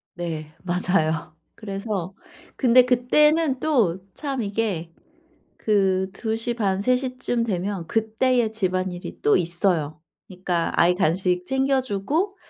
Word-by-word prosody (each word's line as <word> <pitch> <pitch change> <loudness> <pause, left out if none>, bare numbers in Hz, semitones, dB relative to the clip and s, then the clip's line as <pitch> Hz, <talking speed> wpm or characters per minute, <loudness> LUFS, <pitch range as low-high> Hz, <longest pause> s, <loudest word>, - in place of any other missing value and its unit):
네. 160 -3 -5
맞아요. 175 -3 0 0.2
그래서 195 -3 -4 0.4
근데 250 -1 +5
그때는 270 +3 +3
또 230 - +2 0.2
참 275 -4 -3
이게 200 -6 -2 0.7
그 190 -3 +1
2 220 +3 -3
시 230 +2 -2
반, 195 -4 0
3 250 +5 +3
시쯤 250 -2 -2
되면 190 -3 -3
그 220 +4 -2
때의 245 -3 +2
집안일이 185 -3 -3
또 145 - +4
있어요. 170 -3 0 0.3
그러니까 180 -2 -2
아이 175 +1 +5
간식 180 +1 0
챙겨 265 +2 +1
주고 285 - -2
200 Hz, 220 characters per minute, -23 LUFS, 180-245 Hz, 0.7 s, 근데